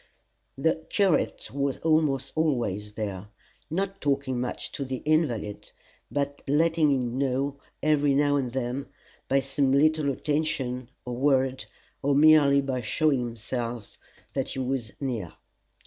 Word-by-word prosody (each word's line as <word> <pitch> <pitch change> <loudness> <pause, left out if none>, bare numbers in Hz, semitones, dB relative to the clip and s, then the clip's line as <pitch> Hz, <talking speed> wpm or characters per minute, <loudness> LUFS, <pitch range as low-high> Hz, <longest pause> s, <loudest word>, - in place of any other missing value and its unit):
The 160 +3 +1
curate 195 -5 +1
was 140 -1 -1
almost 150 -4 +2
always 115 -10 0
there, 105 -2 -4 0.4
not 195 +4 -2
talking 140 -3 0
much 125 - -4
to 140 - -4
the 130 -1 -5
invalid, 125 -10 0 0.4
but 145 0 -2
letting 155 +1 +3
him 125 -2 0
know 140 +1 0 0.2
every 145 -2 +3
now 145 0 +3
and 130 -4 0
then 130 +1 -3 0.4
by 135 +1 +3
some 135 0 +1
little 155 +1 +3
attention 135 -4 -1 0.2
or 125 -1 -4
word, 130 0 +2 0.4
or 140 0 +2
merely 145 -2 +6
by 130 -2 -2
showing 140 +5 +2
himself, 120 -1 -4 0.3
that - - -1
he - - -6
was 130 -4 -2
near. 115 - -3
135 Hz, 130 wpm, -27 LUFS, 125-145 Hz, 0.4 s, merely